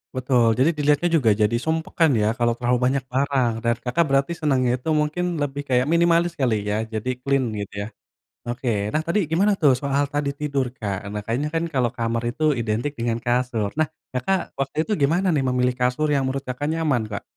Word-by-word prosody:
Betul, 125 Hz, -3 st, +2 dB
jadi 155 Hz, +6 st, +3 dB
dilihatnya 150 Hz, +3 st, +2 dB
juga 125 Hz, -8 st, +3 dB
jadi 105 Hz, +2 st, +3 dB
sumpek 160 Hz, 0 st, -2 dB
kan 160 Hz, -, +6 dB
ya 105 Hz, +1 st, +2 dB
kalau 120 Hz, -1 st, +1 dB
terlalu 125 Hz, 0 st, +1 dB
banyak 135 Hz, +1 st, +1 dB
barang. 135 Hz, -3 st, +1 dB
Dan 115 Hz, 0 st, +1 dB
Kakak 125 Hz, +8 st, 0 dB
berarti 135 Hz, +5 st, +2 dB
senangnya 130 Hz, -5 st, +2 dB
itu 160 Hz, -, -4 dB
mungkin 175 Hz, +3 st, -1 dB
lebih 145 Hz, -1 st, -2 dB
kayak 125 Hz, 0 st, +3 dB
minimalis 170 Hz, 0 st, +3 dB
kali 115 Hz, -9 st, 0 dB
ya, 105 Hz, +1 st, 0 dB
jadi 110 Hz, +4 st, -2 dB
clean 135 Hz, -1 st, +1 dB, 0.2 s
gitu 100 Hz, -, -7 dB
ya. -, -, -7 dB, 0.6 s
Oke, 120 Hz, +1 st, -4 dB, 0.2 s
nah 155 Hz, -, +1 dB
tadi 210 Hz, +5 st, +2 dB
gimana 200 Hz, +6 st, +3 dB
tuh 145 Hz, -3 st, +6 dB
soal 140 Hz, 0 st, 0 dB
tadi 145 Hz, -1 st, 0 dB
tidur, 140 Hz, -3 st, 0 dB
Kak? 100 Hz, -3 st, -3 dB
Nah 105 Hz, 0 st, -4 dB
kayaknya 120 Hz, +7 st, -1 dB
kan 165 Hz, -, +1 dB
kalau 125 Hz, -3 st, +2 dB
kamar 115 Hz, 0 st, -1 dB
itu 155 Hz, -, -5 dB, 0.2 s
identik 115 Hz, +5 st, -1 dB
dengan 115 Hz, 0 st, 0 dB
kasur. 120 Hz, -4 st, 0 dB
Nah, 155 Hz, -, +3 dB, 0.2 s
Kakak, 130 Hz, +10 st, 0 dB, 0.2 s
waktu 135 Hz, +2 st, -3 dB
itu 215 Hz, -, -7 dB
gimana 170 Hz, +7 st, +2 dB
nih 135 Hz, -, +1 dB
memilih 125 Hz, 0 st, +1 dB
kasur 125 Hz, +5 st, +1 dB
yang 135 Hz, -, +1 dB
menurut 135 Hz, +1 st, -3 dB
Kakak, 125 Hz, +4 st, -3 dB
nyaman, 145 Hz, -8 st, +1 dB
Kak? 100 Hz, -, -4 dB
130 Hz, 200 wpm, -23 LUFS, 120-150 Hz, 0.6 s, kan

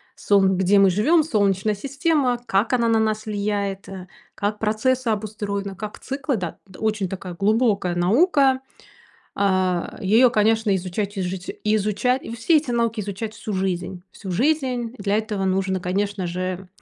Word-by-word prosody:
солн 195 Hz, -2 st, +3 dB
где 190 Hz, +2 st, +4 dB
мы 195 Hz, -1 st, +6 dB
живем, 295 Hz, -, +3 dB
солнечная 205 Hz, -, +1 dB
система, 275 Hz, +2 st, 0 dB
как 205 Hz, +6 st, +1 dB
она 235 Hz, -2 st, +2 dB
на 225 Hz, -1 st, +3 dB
нас 215 Hz, 0 st, 0 dB
влияет, 200 Hz, -2 st, -2 dB
э, 190 Hz, -2 st, -8 dB, 0.3 s
как 205 Hz, +1 st, -2 dB
процессы 230 Hz, +3 st, 0 dB
обустроены, 205 Hz, -2 st, -3 dB
как 210 Hz, +2 st, -7 dB
циклы, 270 Hz, -2 st, -2 dB
да. 175 Hz, -3 st, -5 dB, 0.2 s
Очень 215 Hz, -3 st, 0 dB
такая 185 Hz, -2 st, -6 dB
глубокая 205 Hz, -2 st, +1 dB
наука. 265 Hz, -, +3 dB, 0.7 s
Э, -, -, -3 dB, 0.6 s
её, 225 Hz, +6 st, +5 dB
конечно, 220 Hz, -2 st, +2 dB
изучать 190 Hz, +3 st, -3 dB
и -, -, 0 dB
ижуч 180 Hz, 0 st, -4 dB
и 215 Hz, 0 st, +2 dB
изучать. 215 Hz, +5 st, 0 dB
И 230 Hz, -, -6 dB
все 310 Hz, +8 st, +3 dB
эти 290 Hz, -4 st, -2 dB
науки 230 Hz, -2 st, 0 dB
изучать 205 Hz, +2 st, -4 dB
всю 210 Hz, -, -5 dB
жизнь 185 Hz, -1 st, -2 dB
всю 195 Hz, -3 st, -8 dB
жизнь. 250 Hz, -, 0 dB
Для 200 Hz, 0 st, 0 dB
этого 210 Hz, -3 st, -2 dB
нужно, 190 Hz, 0 st, 0 dB
конечно 195 Hz, +2 st, -2 dB
же, 185 Hz, +1 st, -4 dB
210 Hz, 155 wpm, -22 LUFS, 190-235 Hz, 0.7 s, мы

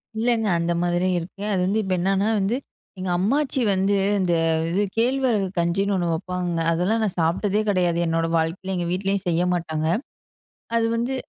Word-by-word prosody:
இல்லைங்க 225 Hz, -1 st, +1 dB
அந்த 170 Hz, +1 st, 0 dB
மாதிரி 175 Hz, +1 st, +1 dB
இருக்கு. 195 Hz, +4 st, -8 dB
அது 185 Hz, -, +1 dB
வந்து, 205 Hz, +4 st, +1 dB
இப்ப 190 Hz, -1 st, -1 dB
என்னன்னா 195 Hz, +3 st, +1 dB
வந்து, 205 Hz, +6 st, 0 dB, 0.4 s
எங்க 185 Hz, 0 st, -3 dB
அம்மாச்சி 265 Hz, +6 st, +1 dB
வந்து, 195 Hz, +2 st, +1 dB, 0.2 s
இந்த 180 Hz, -2 st, +1 dB, 0.4 s
இது 200 Hz, +4 st, +1 dB
கேழ்வரகு 240 Hz, -4 st, +2 dB
கஞ்சின்னு 195 Hz, +4 st, +1 dB
ஒண்ணு 175 Hz, -2 st, 0 dB
வெப்பாங்க. 180 Hz, 0 st, -3 dB
அதெல்லா 180 Hz, +6 st, +1 dB
நான் 195 Hz, -4 st, -2 dB
சாப்ட்டதே 195 Hz, +6 st, +1 dB
கிடையாது, 180 Hz, -3 st, +1 dB
என்னோட 165 Hz, 0 st, 0 dB
வாழ்க்கையில. 165 Hz, +4 st, -2 dB
எங்க 175 Hz, -1 st, -2 dB
வீட்லயும் 195 Hz, +1 st, -1 dB
செய்ய 170 Hz, +1 st, +1 dB
மாட்டாங்க. 160 Hz, -2 st, -2 dB, 0.9 s
அது 230 Hz, -, +2 dB
வந்து 240 Hz, +3 st, -1 dB
190 Hz, 160 wpm, -23 LUFS, 175-210 Hz, 0.9 s, கேழ்வரகு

